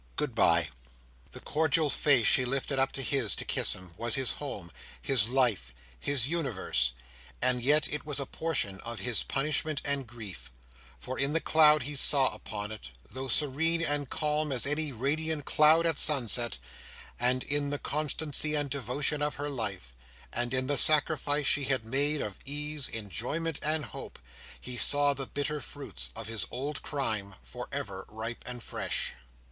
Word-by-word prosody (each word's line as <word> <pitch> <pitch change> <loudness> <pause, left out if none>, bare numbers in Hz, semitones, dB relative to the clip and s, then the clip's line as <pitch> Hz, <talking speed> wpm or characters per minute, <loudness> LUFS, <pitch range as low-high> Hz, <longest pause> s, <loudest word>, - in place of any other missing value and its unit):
Good 145 -5 -2
bye." 85 -7 +3 0.6
The - - -10
cordial 155 -1 0
face 135 -4 +3
she 130 - +6
lifted 135 +1 -2
up 135 0 +1
to 135 - -2
his 125 - +1
to - - -4
kiss - - +1
him, 95 -2 -11
was 115 0 +2
his 135 -2 +1
home, 100 - -7 0.3
his 120 -5 +2
life, 110 - 0 0.2
his 130 - +1
universe, 120 - 0 0.5
and 125 0 +3
yet 145 +4 +3
it 150 - 0
was 145 -2 -2
a 140 - -3
portion 135 -12 -2
of 115 -1 -7
his 120 -2 +2
punishment 150 +1 -1
and 140 -3 -1
grief; 110 - -9 0.5
for - - -7
in 140 +2 +1
the 165 - +2
cloud 155 -3 +4
he 145 +3 -4
saw 135 -1 +5
upon 105 0 -6
it—though 65 - -9
serene 160 +5 +1
and 145 -3 0
calm 150 0 -1
as 130 -3 +2
any 150 +1 0
radiant 145 +4 -2
cloud 155 +2 +4
at 165 -3 +1
sunset—and 120 - +1
in 145 0 -1
the 145 - -3
constancy 150 +1 -2
and 145 -2 -1
devotion 140 +3 -1
of 150 0 -1
her 145 +1 -4
life, 100 - -4 0.4
and 120 0 -1
in 130 0 0
the 145 +1 +1
sacrifice 150 -1 +4
she 140 0 +3
had 130 -4 0
made 145 +5 +1
of 105 -2 -7
ease, 150 0 -2
enjoyment, 125 - -3
and 155 0 0
hope, - - -10 0.4
he 125 - -6
saw 145 +3 +6
the 135 -1 -5
bitter 145 +1 -3
fruits 145 -1 -4
of 115 - -5
his 110 -4 -3
old 140 +4 -5
crime, 110 -9 -4
for - - -9
ever 95 -1 -6
ripe 110 +2 -6
and 125 -2 -6
fresh. - - -2
135 Hz, 165 wpm, -29 LUFS, 115-150 Hz, 0.6 s, she